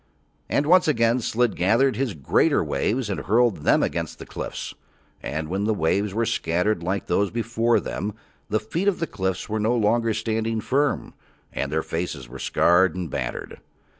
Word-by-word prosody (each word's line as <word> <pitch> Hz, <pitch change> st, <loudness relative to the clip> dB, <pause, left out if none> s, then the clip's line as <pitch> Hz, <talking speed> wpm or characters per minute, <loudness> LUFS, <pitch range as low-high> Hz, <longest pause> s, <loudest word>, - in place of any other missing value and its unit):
And 145 Hz, -, +1 dB
once 180 Hz, +3 st, +5 dB
again 115 Hz, -4 st, +3 dB
Slid 120 Hz, -1 st, 0 dB
gathered 115 Hz, +9 st, +3 dB
his 130 Hz, -7 st, -2 dB
greater 70 Hz, -3 st, +2 dB
waves 120 Hz, +2 st, -1 dB
and 100 Hz, -, -2 dB
hurled 115 Hz, +1 st, +2 dB
them 75 Hz, -, +3 dB
against -, -, -3 dB
the -, -, -9 dB
cliffs; -, -, -6 dB, 0.5 s
and 80 Hz, +2 st, -3 dB
when 95 Hz, +5 st, -1 dB
the 110 Hz, 0 st, +1 dB
waves 100 Hz, +4 st, +1 dB
were 115 Hz, +4 st, 0 dB
scattered 90 Hz, -2 st, 0 dB
like 95 Hz, +3 st, -2 dB
those 100 Hz, -1 st, +1 dB
before 115 Hz, 0 st, +1 dB
them 105 Hz, +1 st, -4 dB, 0.3 s
the 110 Hz, +1 st, +1 dB
feet 165 Hz, -, -3 dB
of 200 Hz, -, +3 dB
the 165 Hz, -, 0 dB
cliffs 95 Hz, -, -3 dB
were 110 Hz, +1 st, -2 dB
no 110 Hz, +3 st, +2 dB
longer 115 Hz, 0 st, +2 dB
standing 110 Hz, 0 st, -1 dB
firm, 140 Hz, +5 st, 0 dB, 0.4 s
and 70 Hz, +2 st, -2 dB
their 80 Hz, 0 st, 0 dB
faces 80 Hz, -6 st, -4 dB
were 65 Hz, +2 st, -10 dB
scarred 90 Hz, +2 st, +3 dB
and 90 Hz, -5 st, -4 dB
battered. -, -, -4 dB
110 Hz, 175 wpm, -24 LUFS, 90-120 Hz, 0.5 s, once